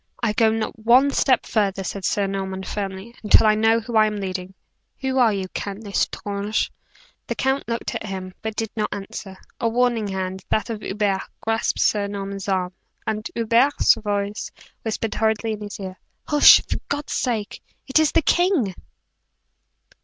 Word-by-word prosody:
"I 220 -3 +2
go 220 +1 +4
not 220 0 -2
one 250 +5 +5
step 260 -2 +2
further," 195 -3 0
said 190 0 -4
Sir 205 - +1
Norman, 190 -1 -3
firmly, 195 +3 -5
"until 215 +1 +6
I 215 - +6
know 225 +1 +3
who 230 +1 -6
I 215 0 +6
am 210 - -3
leading. 190 -1 -5 0.5
Who 265 -1 0
are 235 -3 +5
you, 195 -2 -2
Count 200 +3 -5
L'Estrange?" 205 +1 -1 0.6
The - - -2
count 265 +1 0
looked 230 0 -3
at 215 - -4
him, 185 -1 -5
but 220 -1 -4
did 225 -1 -3
not 210 -1 -1
answer. 195 -1 -7 0.2
A 230 - +1
warning 235 -2 +1
hand 190 -1 -4
that 220 +2 0
of 215 -2 -5
Hubert 195 -1 0 0.2
grasped 225 0 0
Sir 205 -1 +2
Norman's 200 -1 -5
arm; 185 -1 0 0.3
and 215 0 -2
Hubert's 235 +5 +4
voice 205 -1 -3 0.3
whispered 220 0 -2
hurriedly 220 0 0
in 215 -1 -5
his 205 0 -7
ear: 185 -2 -7 0.3
"Hush, 295 -1 +8
for - - -2
God's 290 0 -3
sake! 225 -5 -2 0.3
It 270 +3 +4
is 315 -1 +3
the 330 - +3
king!" 345 - +2
215 Hz, 170 wpm, -23 LUFS, 195-230 Hz, 0.6 s, Hush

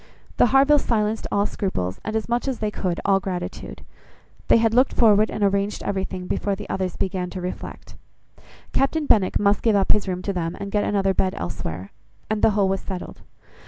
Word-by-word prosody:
The - - +5
Harvilles 275 +4 +4
silenced 215 -1 0
all 200 0 +2
scruples; 95 - -3
and, 215 - -4
as 220 - -1
much 240 +3 -1
as 265 -3 -1
they 215 -1 -2
could, 180 -4 -2
all 195 -1 +4
gratitude. 180 -2 -6 0.6
They - - +6
had 225 -1 +2
looked 255 +3 +3
forward 215 -2 +4
and 210 - -3
arranged 200 +1 0
everything 190 -2 -3
before 200 +2 -1
the 205 +1 -8
others 185 -2 -2
began 185 -1 -2
to 185 - -6
reflect. 180 0 -7 0.8
Captain 295 +3 +1
Benwick 200 -8 +3
must 200 0 +2
give 225 -3 +3
up 195 -1 +2
his 210 -2 +2
room 180 -1 -3
to 200 - -2
them, 165 -2 -3
and 200 0 -5
get 205 0 +1
another 195 -2 +1
bed 185 0 0
elsewhere; 85 +1 -5 0.4
and 215 -1 0
the - - +5
whole 200 -2 +3
was 195 0 -1
settled. 185 -2 -7
200 Hz, 195 wpm, -23 LUFS, 185-215 Hz, 0.8 s, They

